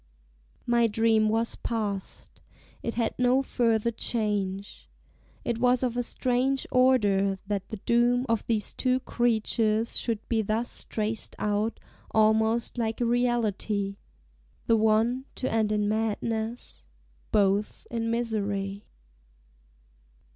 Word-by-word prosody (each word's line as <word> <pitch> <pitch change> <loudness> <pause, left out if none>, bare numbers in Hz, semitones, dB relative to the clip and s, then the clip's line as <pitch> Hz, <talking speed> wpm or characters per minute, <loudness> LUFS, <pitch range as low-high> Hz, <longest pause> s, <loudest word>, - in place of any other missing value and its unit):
My 235 -1 +3
dream 220 0 +3
was 225 +1 0
past; 205 -4 -4 0.4
it 230 - -3
had 230 -1 0
no 250 +2 +3
further 235 -3 +1
change. 205 -4 -3 0.6
It 235 -1 -1
was 250 +1 +3
of 245 -2 0
a 245 - +1
strange 255 +2 0
order, 205 -7 +3
that 200 -1 -3
the 220 - -5
doom 245 +1 +3
Of 230 -2 0
these 220 -3 -1
two 255 0 +1
creatures 225 -2 +1
should 225 -3 -3
be 225 -2 +1
thus 220 +3 -2
traced 220 0 -2
out 210 +2 -1 0.3
Almost 220 +2 +2
like 225 -1 -1
a 240 - +1
reality, 220 -4 0 0.7
the 230 - +4
one 225 +4 +2
To 260 - -2
end 220 -2 +1
in 210 -1 +1
madness 220 +2 -2 0.5
both 205 0 +1
in 230 -1 -1
misery. 205 -4 -2
225 Hz, 120 wpm, -27 LUFS, 210-240 Hz, 0.7 s, the